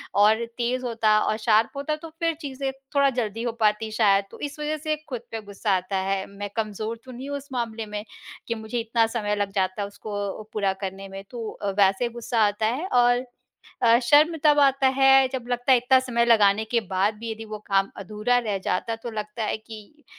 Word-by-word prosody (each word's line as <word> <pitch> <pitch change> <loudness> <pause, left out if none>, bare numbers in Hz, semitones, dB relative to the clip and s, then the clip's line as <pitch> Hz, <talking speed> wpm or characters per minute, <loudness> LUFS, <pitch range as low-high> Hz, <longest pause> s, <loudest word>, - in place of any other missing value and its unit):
और 215 +3 +4
तेज़ 250 +1 -1
होता 225 -3 +2
और 215 - 0
शार्प 225 +3 +2
होता 305 +2 -1
तो 320 +1 -10
फिर 330 -1 +1
चीज़ें 275 -2 -3 0.2
थोड़ा 280 -1 +5
जल्दी 230 -3 -3
हो 240 - -1
पाती 215 0 +1
शायद। 200 -3 +3
तो - - -12
इस 290 +1 -6
वज़ह 305 +1 -2
से 310 0 -1
खुद 245 -3 -4
पे 225 - -4
गुस्सा 205 0 -3
आता 185 +2 -3
है। 195 0 -1
मैं 200 0 -7
कमज़ोर 220 +1 -3
तो 255 - -10
नहीं 260 +3 -7
हूँ 285 - -2
उस 280 - -11
मामले 230 -2 -3
में 210 0 -5 0.4
कि 230 - -1
मुझे 220 +2 -4
इतना 230 0 +2
समय 210 -3 -1
लग 205 -1 -2
जाता 190 0 0
है 200 - -2
उसको 205 0 -5
पूरा 200 -3 +1
करने 195 0 -5
में। 195 0 -8
तो 230 -3 -5
अ, 205 - -4
वैसे 195 +5 +3
गुस्सा 235 -1 -2
आता 205 +1 0
है 255 +10 -1
और 245 -1 +3 0.6
अ, 235 0 +6
शर्म 300 +6 +5
तब 295 -1 +5
आता 275 -1 +4
है 270 0 +6
जब 260 -3 -3
लगता 245 +2 +2
है 255 - +7
इत्ता 255 +2 +4
समय 235 -2 +1
लगाने 215 -2 +4
के 230 +1 0
बाद 195 +3 +1
भी 230 0 -5
यदि 220 0 -6
वो 215 -1 -7
काम 195 -1 +2
अधूरा 215 +5 0
रह 210 -5 -2
जाता 225 +5 -1
तो 235 +1 -7
लगता 215 +1 -4
है 215 - -1
कि 220 +7 -13
225 Hz, 215 wpm, -25 LUFS, 210-250 Hz, 0.6 s, है